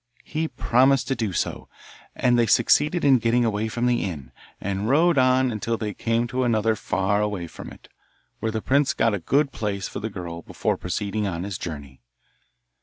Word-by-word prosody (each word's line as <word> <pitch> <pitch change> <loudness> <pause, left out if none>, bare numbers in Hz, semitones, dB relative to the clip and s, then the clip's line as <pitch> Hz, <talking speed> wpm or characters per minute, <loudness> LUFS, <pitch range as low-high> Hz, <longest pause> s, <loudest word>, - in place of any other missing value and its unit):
He 160 +1 -2
promised 130 -1 +2
to 135 - +1
do 110 -5 -2
so, 90 - -3 0.5
and 125 - +2
they 120 -1 +3
succeeded 150 +9 +3
in 135 -3 +6
getting 115 +1 +2
away 110 0 -1
from 120 +2 -2
the 125 -1 +2
inn, 75 -9 -6 0.3
and 100 +2 -2
rode 160 +2 +4
on 130 0 +3
until 115 +1 -2
they 105 -2 -4
came 115 +3 0
to 130 +1 -1
another 110 -2 +2
far 95 +1 0
away 105 -4 -2
from 85 - -10
it, - - -15 0.5
where 110 - -1
the 110 0 -3
prince 140 +1 +2
got 115 -1 +2
a 100 - -1
good 140 - +1
place 100 -5 -3
for - - -6
the 110 - -4
girl 85 -4 -7
before - - -2
proceeding 100 +3 -3
on 85 -2 -3
his 100 -1 -5
journey. 70 -6 -7
110 Hz, 190 wpm, -24 LUFS, 100-125 Hz, 0.5 s, in